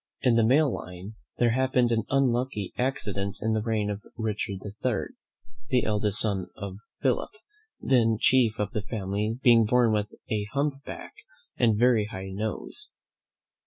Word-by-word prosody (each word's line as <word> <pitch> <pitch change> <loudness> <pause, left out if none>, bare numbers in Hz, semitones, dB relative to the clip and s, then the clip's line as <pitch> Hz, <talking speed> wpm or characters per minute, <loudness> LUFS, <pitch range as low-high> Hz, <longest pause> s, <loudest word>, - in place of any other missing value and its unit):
In 125 -3 +4
the 115 - +4
male 135 +4 +4
line 90 +4 -8 0.2
there 120 -1 +3
happened 130 -1 +2
an 115 -2 +1
unlucky 125 -6 0
accident 100 -6 -2
in 110 0 0
the 110 - 0
reign 110 -2 -1
of 100 0 -5 0.2
Richard 105 -3 -3
III., 105 +3 -3 0.6
the 125 - +2
eldest 105 -1 +3
son 100 -4 0
of 100 -1 -7 0.2
Philip, - - +1 0.5
then 115 -4 +3
chief 120 -4 +3
of 105 - -2
the 105 - -2
family, 105 +1 -3
being 115 -3 +6
born 120 +1 +3
with 105 -1 -1 0.2
a 105 -2 0
hump 140 0 -1
back - - -8 0.4
and 115 -3 +2
very 120 -2 +4
high 95 -3 -7
nose. 110 - -2
110 Hz, 155 wpm, -27 LUFS, 105-125 Hz, 0.6 s, being